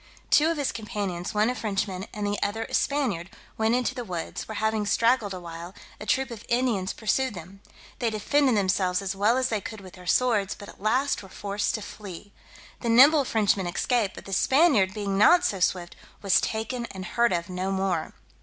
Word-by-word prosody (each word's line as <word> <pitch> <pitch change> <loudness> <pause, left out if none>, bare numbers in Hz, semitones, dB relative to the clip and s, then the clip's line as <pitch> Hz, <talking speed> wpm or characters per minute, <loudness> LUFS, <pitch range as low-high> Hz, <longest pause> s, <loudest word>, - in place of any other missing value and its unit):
Two 310 +2 +5
of 330 - -1
his 285 -3 0
companions, 200 -5 -4
one 210 +1 +3
a 250 - +1
Frenchman 195 -4 -3
and 210 -1 -4
the 205 0 -1
other 215 +2 -1
a - - -10
Spaniard, 240 -12 0 0.3
went 220 +2 +2
into 250 0 0
the 250 -2 -5
woods, 175 -6 -5
where 220 - -6
having 220 0 0
straggled 230 -1 +2
awhile, 175 0 -8 0.2
a - - -8
troop 265 -3 +1
of 225 -3 -8
Indians 235 -6 +1
pursued 225 +2 -1
them. 185 +3 -11 0.4
They 235 - +1
defended 250 +3 +2
themselves 185 -1 +1
as 195 0 -3
well 210 +5 +3
as 260 0 +1
they 215 -3 -1
could 220 +2 -7
with 185 -2 -12
their 180 -1 -13
swords, 215 -3 +2
but 205 - -11
at - - -15
last 255 +7 +1
were 195 - -13
forced 205 +2 -2
to 215 - -5
flee. 200 -1 -10 0.5
The 235 - -3
nimble 275 +5 +7
Frenchman 205 -5 +1
escaped; 210 +3 0
but - - -11
the 195 - -6
Spaniard 260 - +4
being 200 -2 -2
not 350 +12 +6
so 195 - 0
swift, 180 -1 0 0.3
was 195 - +4
taken 235 +2 -3
and 190 -3 -8
heard 235 +5 +2
of 170 -1 -1
no 185 +1 -3
more. 190 -4 -1
210 Hz, 200 wpm, -26 LUFS, 190-240 Hz, 0.5 s, nimble